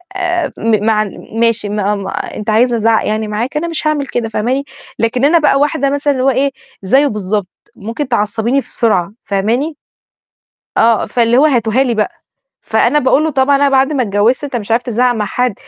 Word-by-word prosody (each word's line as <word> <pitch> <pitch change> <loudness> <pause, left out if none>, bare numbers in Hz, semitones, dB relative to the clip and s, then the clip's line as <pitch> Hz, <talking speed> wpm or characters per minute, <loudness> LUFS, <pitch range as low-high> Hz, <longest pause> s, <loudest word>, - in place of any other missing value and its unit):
آآ 355 -4 -1
م 215 -2 0
مع 215 -1 +2 0.3
ماشي 230 -2 0
ما 205 0 0
ما 195 -1 -5 0.2
أنت 210 +1 -5
عايزني 235 +2 +3
أزعق 225 0 +2
يعني 215 0 -1
معاك، 235 +8 -3
أنا 340 +3 -2
مش 325 -2 -3
هاعمل 290 -3 0
كده، 230 -2 -3
فاهماني؟ 250 +6 -1 0.4
لكن 240 +3 +1
أنا 330 +3 +4
بقى 285 -2 +3
واحدة 280 -1 +1
مثلًا 285 0 0
اللي 255 -1 -2
هو 270 - +4
إيه؟ 270 +2 +1 0.3
زيه 270 +9 +3
بالضبط 205 -2 -2 0.3
ممكن 230 +7 -5
تعصبيني 230 +3 0
بسرعة، 210 -7 -1
فاهماني؟ 235 +11 -1 1.0
آه، 225 -1 +3
فاللي 235 0 +1
هو 290 +4 +5
هاتوها 240 -2 +2
لي 245 -3 0
بقى، 215 -2 0 0.5
فأنا 240 +6 +2
باقول 275 +3 +2
له: 315 - +1
"طبعًا 270 +1 +2
أنا 280 0 +3
بعد 270 +2 +2
ما 260 - +1
اتجوزت 215 +6 +1
أنت 275 -3 -4
مش 225 -1 -4
عارف 235 +2 +2
تزعق 245 +1 +1
مع 215 -2 -2
حد" 245 +3 -1
240 Hz, 190 wpm, -15 LUFS, 215-275 Hz, 1.0 s, هو